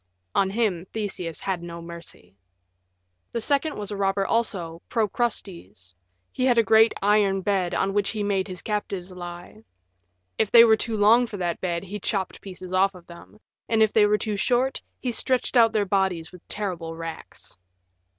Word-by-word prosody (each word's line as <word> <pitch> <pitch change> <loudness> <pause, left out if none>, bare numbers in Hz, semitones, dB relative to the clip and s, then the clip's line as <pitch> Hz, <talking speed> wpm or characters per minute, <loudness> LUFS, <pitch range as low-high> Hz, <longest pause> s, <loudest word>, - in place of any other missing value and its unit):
On 195 - +2
him 195 -5 -1
Theseus 190 -7 -4
had 190 -3 -2
no 170 0 -7
mercy. 170 - -11 1.0
The 235 - -1
second 285 +5 +1
was 210 0 -4
a - - -3
robber 195 0 0
also, 180 -8 -1
Procrustes: 190 - -3 0.4
he 255 - -3
had 245 -2 +3
a 230 - +6
great 220 +2 +5
iron 200 -2 +3
bed 190 -2 0
on 195 0 0
which 205 -1 +1
he 215 -2 -2
made 200 -1 0
his 185 -3 -8
captives 195 -3 -3
lie; 175 -9 -9 0.8
if 220 - +2
they 230 +1 +9
were 225 -1 +6
too 220 0 -3
long 225 +4 +5
for 210 - -7
that 175 -2 -2
bed 170 -1 -2
he 200 +2 -6
chopped 195 -1 -2
pieces 185 -1 -9
off 195 +1 +3
them, 170 +5 -14 0.3
and 225 -1 +4
if 215 - +1
they 210 -2 +5
were 210 0 +3
too 210 -1 -3
short 250 +5 +1 0.2
he 250 - -2
stretched 255 +2 -1
out 230 -2 +6
their 215 -2 +1
bodies 190 -4 0
with 180 -2 -13
terrible 175 -6 -4
racks. 165 - -9
195 Hz, 175 wpm, -25 LUFS, 180-220 Hz, 1.0 s, they